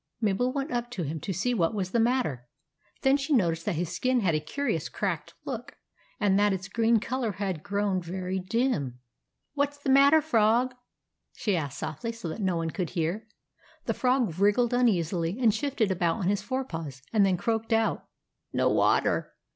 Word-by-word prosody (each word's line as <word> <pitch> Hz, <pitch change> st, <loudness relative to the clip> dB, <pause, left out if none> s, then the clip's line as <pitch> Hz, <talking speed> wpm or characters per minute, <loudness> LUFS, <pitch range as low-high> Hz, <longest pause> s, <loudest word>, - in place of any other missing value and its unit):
Mabel 225 Hz, +3 st, +1 dB
went 275 Hz, +2 st, -3 dB
up 240 Hz, 0 st, -2 dB
to 200 Hz, -8 st, -4 dB
him, 155 Hz, +2 st, -3 dB
to 195 Hz, -, -4 dB
see 205 Hz, +8 st, 0 dB
what 175 Hz, -2 st, +1 dB
was 185 Hz, -3 st, -2 dB
the 235 Hz, -, +2 dB
matter. 225 Hz, -, 0 dB, 0.6 s
Then 270 Hz, 0 st, +5 dB
she 280 Hz, +2 st, -1 dB
noticed 170 Hz, -9 st, +2 dB
that -, -, +1 dB
his 175 Hz, +2 st, -2 dB
skin 255 Hz, +3 st, +1 dB
had 180 Hz, -5 st, +2 dB
a 155 Hz, -, +2 dB
curious 280 Hz, -, -2 dB
cracked -, -, -3 dB
look, -, -, -6 dB, 0.4 s
and 200 Hz, -2 st, +3 dB
that 205 Hz, -1 st, +3 dB
its 190 Hz, +1 st, -4 dB
green 230 Hz, +1 st, +2 dB
colour 240 Hz, -1 st, -2 dB
had 190 Hz, -4 st, -3 dB
grown 200 Hz, -1 st, -1 dB
very 185 Hz, +2 st, -3 dB
dim. 185 Hz, -, -1 dB, 0.6 s
"What's 285 Hz, 0 st, 0 dB
the 285 Hz, -2 st, -1 dB
matter, 280 Hz, +3 st, +7 dB
Frog?" 245 Hz, -3 st, +2 dB, 0.6 s
she 205 Hz, -4 st, -1 dB
asked 145 Hz, -4 st, -3 dB
softly 155 Hz, +11 st, -4 dB
so 230 Hz, -6 st, -7 dB
that 185 Hz, +7 st, -5 dB
no 190 Hz, -3 st, +1 dB
one 165 Hz, -1 st, -2 dB
could 180 Hz, -3 st, -3 dB
hear. 180 Hz, +6 st, -2 dB, 0.6 s
The -, -, 0 dB
Frog 250 Hz, -9 st, +1 dB
wriggled 210 Hz, +5 st, +3 dB
uneasily, 180 Hz, -6 st, +1 dB
and 230 Hz, -4 st, +4 dB
shifted 265 Hz, -8 st, 0 dB
about 175 Hz, -3 st, +1 dB
on 185 Hz, -, -1 dB
his 205 Hz, 0 st, +1 dB
fore 260 Hz, +5 st, -2 dB
paws, 150 Hz, -, -7 dB
and 210 Hz, -2 st, +5 dB
then 190 Hz, -2 st, +3 dB
croaked 225 Hz, +3 st, -1 dB
out, 225 Hz, 0 st, +1 dB
— -, -, -56 dB
" -, -, -56 dB
No -, -, +2 dB
water -, -, +2 dB
205 Hz, 195 wpm, -28 LUFS, 175-245 Hz, 0.6 s, matter